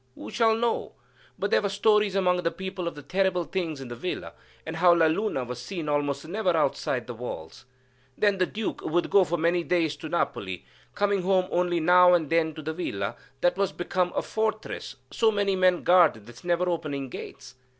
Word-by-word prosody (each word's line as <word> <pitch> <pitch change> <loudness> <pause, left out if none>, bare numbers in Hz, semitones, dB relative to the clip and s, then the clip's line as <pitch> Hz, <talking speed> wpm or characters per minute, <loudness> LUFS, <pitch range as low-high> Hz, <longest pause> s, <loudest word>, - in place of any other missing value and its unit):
Who - - -9
shall 225 -1 +3
know? 230 0 -1 0.4
But - - -2
there - - +4
were 200 - -1
stories 210 0 +2
among 180 -2 +2
the 170 - +1
people 185 +1 -5
of 150 -4 -7
terrible 190 -2 +1
things 165 -4 -3
in 135 - -7
the 120 - -7
villa, 180 +10 -5 0.3
and 160 0 -5
how 175 +1 +6
La 165 -1 +4
Luna 160 -3 0
was 125 0 -6
seen 170 +1 -5
almost 145 0 -1
never 185 -2 0
outside 135 -4 0
the 120 - -6
walls. 115 -4 -8 0.5
Then 205 -2 +2
the 185 - +2
Duke 215 0 -4
would 175 +2 -1
go 200 - +6
for 175 -1 -1
many 170 +2 +1
days 165 -4 +1
to 155 - -7
Napoli, 95 - -2 0.3
coming 205 -1 +1
home 185 0 +2
only 175 -1 +1
now 180 +2 +6
and 160 -4 -1
then 160 -2 +2
to 155 - -8
the 160 +2 -3
villa 100 - -3 0.3
that 175 - +2
was 200 -1 +1
become 180 0 -1
a - - 0
fortress, 220 - -3 0.2
so 225 - +3
many 200 -2 +1
men 185 -1 +3
guarded 170 - +4
its 120 0 -13
never 175 +1 +1
opening 145 -6 -2
gates. - - -9
175 Hz, 200 wpm, -26 LUFS, 155-190 Hz, 0.5 s, how